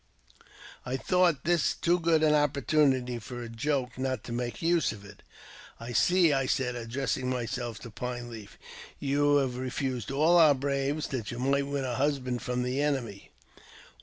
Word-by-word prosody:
I 125 +2 -3
thought 180 -1 +2
this 170 -3 +2
too 175 +1 +1
good 165 -2 +2
an 155 -1 +4
opportunity 140 -4 +2
for 120 +3 -7
a - - -6
joke 125 +1 -2
not 130 -4 -2
to - - -8
make 120 0 -3
use 170 -2 +2
of 100 -2 -10
it. 100 - -14 0.6
"I 115 +1 -7
see," 170 - +4 0.2
said 125 -2 0
I - - -4
addressing 125 +2 -2
myself 120 -2 -3
to 115 - -9
Pine 125 +1 -5
Leaf, 110 -3 -10 0.4
"you 145 +1 +2
have, 130 -3 +1
refused 130 -2 -3
all 155 +6 +4
our 155 -3 +7
braves 140 +2 -1
that 120 -6 -4
you 120 - -5
might 140 +2 +1
win 140 -1 -2
a 125 - -2
husband 130 -3 -1
from 125 0 -2
the 130 +3 -1
i«nemy." 125 -9 -2
130 Hz, 170 wpm, -29 LUFS, 120-145 Hz, 0.6 s, our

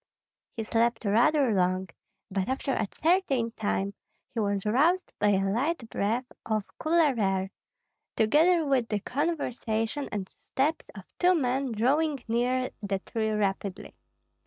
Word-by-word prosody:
He 225 - -1
slept 230 +1 +1
rather 240 +5 +3
long, 185 0 +1 0.4
but 190 +2 -1
after 265 +1 -1
a 215 - 0
certain 300 -9 +1
time 200 -3 -2 0.4
he 230 - -2
was 200 -2 0
roused 310 +12 +2
by 210 - +3
a 195 -1 +2
light 250 +5 -1
breath 230 +6 0 0.2
of 215 -2 -3
cooler 315 -3 +3
air, 190 -1 0 0.6
together 315 +9 +4
with 265 -5 +1
the 210 - 0
conversation 250 - -2
and 200 -3 -3
steps 295 +10 -2
of 195 - -9 0.2
two 365 0 +5
men 265 -3 0
drawing 275 +5 +1
near 250 +3 0
the 200 -1 -1
tree 220 +3 -2
rapidly. 200 -1 -2
230 Hz, 135 wpm, -28 LUFS, 205-280 Hz, 0.6 s, two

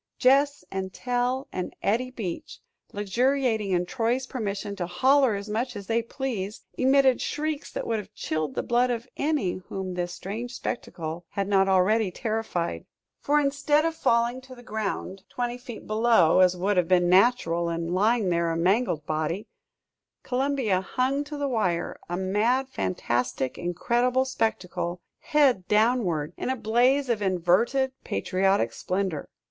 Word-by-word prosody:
Gess 280 +2 +3
and 190 0 -3
Tell 250 +4 -1
and 180 - -4
Eddie 235 +6 +1
Beach, 210 -9 -6 0.3
luxuriating 225 +1 0
in 180 -1 +1
Troy's 245 +4 -1
permission 205 -5 -4
to 175 -2 -2
"holler 260 +6 +3
as 200 +1 -5
much 235 +4 -2
as 200 -1 -7
they 230 +2 +1
pleased," 225 -5 -5
emitted 265 0 +4
shrieks 305 0 -3
that - - -4
would 225 -1 0
have 205 0 -9
chilled 155 -3 -3
the - - -1
blood 245 +1 +2
of 240 0 -3
any 280 - -1
whom 190 -1 -4
this 175 0 -3
strange 225 +8 -6
spectacle 170 -8 -5
had 200 -1 -2
not 195 -1 +3
already 195 +3 +3
terrified. 215 -4 -3 0.3
For, 295 +1 +2
instead 290 +2 +2
of 330 - 0
falling 235 -4 +1
to 260 0 -12
the 245 - -14
ground 210 -4 -4
twenty 245 0 -3
feet 245 -3 -9
below, 215 -6 +4
as 180 -1 +5
would 195 +2 0
have 180 -2 +3
been 175 -1 +4
natural, 180 -4 +3
and 170 +1 -2
lying 210 +1 +2
there, 170 -1 +1
a 165 - -1
mangled 180 -3 +1
body, 155 +7 -2 0.8
Columbia 255 -7 0
hung 260 +8 0
to 295 0 -6
the 285 -1 -1
wire, 185 -9 -1
a 175 - -2
mad, 220 +8 +1
fantastic, 125 - -1
incredible 240 +9 +1
spectacle, 180 -8 -2 0.2
head 265 -11 +2
downward, 210 -8 +2
in - - -3
a 260 - +1
blaze 250 +4 +2
of 230 -4 0
inverted 195 +9 +2
patriotic 185 - +1
splendor! 185 +3 -2
215 Hz, 150 wpm, -26 LUFS, 180-255 Hz, 0.8 s, as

